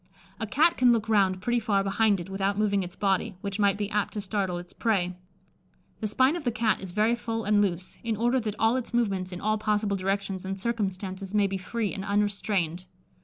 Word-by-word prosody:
A 225 - -2
cat 315 +10 +3
can 250 -1 +5
look 225 -2 +1
round 190 -4 +2
pretty 240 +2 +2
far 205 -4 +1
behind 200 0 +2
it 175 - -6
without 195 +1 -1
moving 205 -2 +2
its 180 0 -6
body, 195 +1 0
which 200 0 -4
might 200 -1 +3
be 205 -1 -1
apt 210 0 0
to 210 - -3
startle 190 -3 -1
its 175 +1 -9
prey. 185 -6 0 0.8
The 220 - -1
spine 260 +8 +3
of 345 - -4
the 245 - +1
Cat 220 -3 +1
is 190 - -6
very 215 +5 +2
full 230 -1 -3
and 210 0 +3
loose, 185 -2 -2
in 225 -2 -1
order 240 +4 +2
that 215 -3 -3
all 225 +3 +3
its 245 -1 -4
movements 195 -6 0
in 180 - -6
all 215 +2 0
possible 210 -1 +1
directions 195 0 -2
and 190 0 -4
circumstances 195 -3 -3
may 205 -1 +4
be 195 -1 -2
free 215 +2 -2
and 195 - -5
unrestrained. 200 -4 0
205 Hz, 220 wpm, -27 LUFS, 195-225 Hz, 0.8 s, can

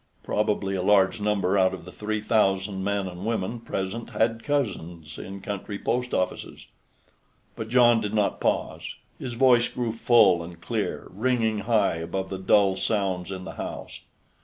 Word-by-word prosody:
Probably 105 -2 0
a 95 - -1
large 100 +2 +3
number 100 -2 +1
out 95 0 +3
of 85 - -12
the 90 - -9
three 105 +1 -3
thousand 95 -3 +1
men 100 -1 -1
and 90 0 -8
women 115 +1 -2
present 115 +1 -4
had 115 0 0
cousins 90 - -3
in 95 +1 -7
country 100 +1 -5
post 125 +4 -1
offices. 90 0 -3 0.9
But 110 -1 -6
John 120 -2 +5
did 105 +1 -3
not 105 -2 +1
pause; - - -1 0.2
his 125 - -5
voice 120 -1 +5
grew 120 -2 -2
full 115 -6 +4
and 85 0 -10
clear, - - -3
ringing 110 0 0
high 105 -4 +2
above 90 +4 -4
the 95 - -4
dull 95 0 +4
sounds 95 -4 -1
in 95 -1 -5
the - - -8
house. - - -7
100 Hz, 160 wpm, -26 LUFS, 95-115 Hz, 0.9 s, John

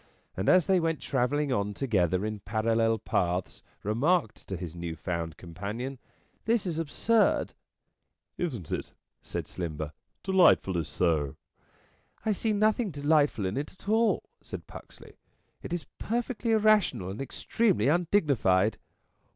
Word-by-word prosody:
and 95 +3 0
as 185 -3 +6
they 190 -1 +4
went 165 -2 0
travelling 140 +2 0
on 100 -1 -1
together 95 -7 +1
in 110 -1 -3
parallel 115 +2 +1
paths 90 -3 -1 0.2
remarked 120 - +1
to 95 - -4
his 85 -1 -6
new 85 -1 -4
found 85 -1 -4
companion: 105 +10 -5 0.2
" - - -40
This 230 -2 +2
is 165 -3 -2
absurd." 210 +8 +2 0.4
" - - -55
Isn't 125 - -3
it?" - - -3 0.3
said - - -4
Slimber. 80 -3 -5 0.2
" - - -49
Delightfully 135 - +4
so." 75 -5 0 0.4
" - - -35
I 220 - +2
see 215 +2 0
nothing 215 +1 +2
delightful 145 - +2
in 95 +5 -2
it 145 +2 -4
at 190 - -20
all," 225 +2 +3 0.2
said - - -8
Puxley. - - -13 0.2
" - - -45
It - - -8
is 175 -2 -2
perfectly 235 +1 -2
irrational 210 - +3
and 105 - -6
extremely 180 - +1
undignified." 140 - +2
125 Hz, 145 wpm, -29 LUFS, -, 0.4 s, as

